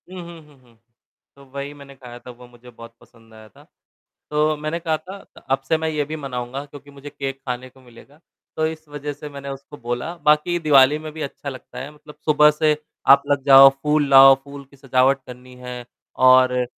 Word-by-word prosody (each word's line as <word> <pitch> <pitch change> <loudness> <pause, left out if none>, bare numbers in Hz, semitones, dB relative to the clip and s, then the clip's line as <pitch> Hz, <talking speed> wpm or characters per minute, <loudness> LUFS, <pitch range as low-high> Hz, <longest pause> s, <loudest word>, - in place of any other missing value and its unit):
उहुँ, 185 -1 -9 0.2
हुँ, 150 -2 -22
हुँ। 120 -2 -26 0.6
तो 140 0 -18
वही 140 +1 -6
मैंने 140 -1 -14
खाया 125 -2 -12
था, 125 - -12
वो 125 0 -16
मुझे 120 0 -17
बहुत 115 -1 -14
पसंद 115 -1 -22
आया 110 0 -15
था, - - -20 0.7
तो 150 +1 +1
मैंने 155 +2 -4
कहा 160 -2 -1
था 185 +5 -11 0.2
अ - - -15
अब 135 0 +1
से 160 - +2
मैं 160 0 -2
ये 150 -2 -2
भी 155 +2 -6
मनाऊँगा 130 -1 -6
क्योंकि 145 0 -14
मुझे 140 +1 -12
केक 135 -1 -6
खाने 125 +1 -4
को 130 - -22
मिलेगा, 130 +4 -19 0.4
तो 155 - 0
इस 160 -1 -7
वज़ह 145 0 -6
से 145 +1 -10
मैंने 140 -1 -10
उसको 140 +1 -9
बोला, 120 +8 -5
बाकी 150 +2 +1
दिवाली 145 -2 +4
में 155 0 -9
भी 155 0 -7
अच्छा 140 +1 -7
लगता 130 -2 -10
है 135 +3 -7
मतलब 150 0 -16
सुबह 150 0 +5
से 150 0 +1 0.3
आप 140 0 +7
लग 140 -1 +1
जाओ 135 0 +9
फूल 150 -1 +1
लाओ, 135 0 +9
फूल 140 0 -11
की 140 - -19
सजावट 135 0 +1
करनी 125 0 -13
है 125 -1 -8 0.3
और 130 -1 +4
140 Hz, 210 wpm, -21 LUFS, 130-150 Hz, 0.7 s, जाओ